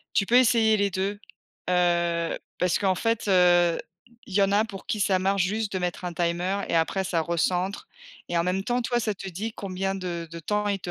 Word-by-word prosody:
Tu 195 - +3
peux 240 - +4
essayer 230 -3 +5
les 200 -1 +1
2, 195 +2 -2 0.5
heu, 170 -1 +1 0.2
parce 180 -1 +1
qu'en 190 -2 +2
fait, 225 +3 -1
heu, 175 -2 +4 0.5
il 190 - -9
y 200 - +4
en 195 0 +2
a 210 +2 +4
pour 195 -3 -9
qui 215 - -2
ça 190 -1 +3
marche 195 +1 +1
juste 210 +3 -1
de 190 - -1
mettre 180 0 -3
un 175 - -3
timer 175 +4 -1
et - - -1
après 165 +4 +1
ça 175 -3 0
recentre 180 - -1 0.4
et 175 - -2
en 170 - +2
même 185 +2 0
temps 245 +4 -1
toi, 240 0 0
ça 215 -2 -1
te 195 - -9
dit 210 +5 -5
combien 195 0 -3
de 175 -3 -5
de 170 - -7
temps 210 +6 -1
il 200 -1 0
te 175 - -6
190 Hz, 225 wpm, -26 LUFS, 175-205 Hz, 0.5 s, essayer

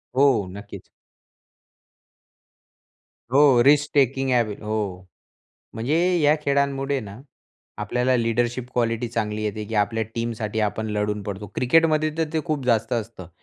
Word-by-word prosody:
हो, 130 -6 +4
नक्कीच. 100 +2 -10 2.4
हो, 135 -3 +6
रिस्क 145 +3 +4
टेकिंग 135 -1 +2
एबी 115 -4 +1
हो, 105 0 -3 1.0
म्हणजे 120 +8 0 0.2
या 150 +1 +4
खेळांमुळे 140 -1 0
ना, 100 -2 -9 0.6
आपल्याला 125 +1 0
लीडरशिप 120 +1 -1
क्वालिटी 115 0 0
चांगली 110 -2 -3
येते 105 0 -3
की 110 +1 -5
आपल्या 115 +2 -3
टीमसाठी 115 -2 -3
आपण 110 +1 -1
लढून 105 0 -1
पडतो. 100 +1 -6
क्रिकेटमध्ये 155 +3 +3
तर 165 - +2
ते 160 - +1
खूप 150 -5 -2
जास्त 115 -1 +1
असतं. 110 -6 -5
120 Hz, 125 wpm, -23 LUFS, 110-140 Hz, 2.4 s, हो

